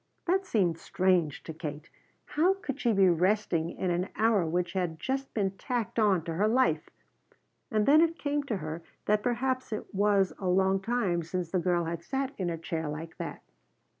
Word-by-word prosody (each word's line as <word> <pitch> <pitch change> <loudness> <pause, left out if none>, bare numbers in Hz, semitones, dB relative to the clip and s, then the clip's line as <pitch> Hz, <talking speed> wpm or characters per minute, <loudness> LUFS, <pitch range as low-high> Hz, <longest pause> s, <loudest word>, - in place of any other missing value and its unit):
That 380 +2 +1
seemed 180 - +1
strange 180 -6 +1
to 160 - -7
Kate. 155 -1 -6 0.4
How 350 +6 +2
could 285 -8 -5
she 240 - +3
be 195 -3 +5
resting 175 -1 +2
in 180 0 -2
an 180 +3 -1
hour 215 -6 +3
which 175 +1 -1
had 180 -4 -1
just 270 +6 -2
been 195 -3 +1
tacked 230 +3 -3
on 200 -6 +3
to 165 - -4
her 200 +6 +2
life? 255 +4 +2 0.8
And 215 -2 +1
then 300 +3 +7
it 330 0 +2
came 290 0 -1
to 225 -7 -1
her 155 0 -5 0.2
that 210 0 +2
perhaps 255 +2 -1
it 215 - -5
was 200 -1 +3
a 190 - -3
long 190 +1 +3
time 195 -6 0
since 170 +1 -4
the 185 - +2
girl 175 0 +1
had 165 0 -3
sat 270 0 -2
in 180 -2 0
a 165 - -2
chair 160 -1 -3
like 160 +2 -7
that. - - -6
195 Hz, 195 wpm, -29 LUFS, 170-240 Hz, 0.8 s, then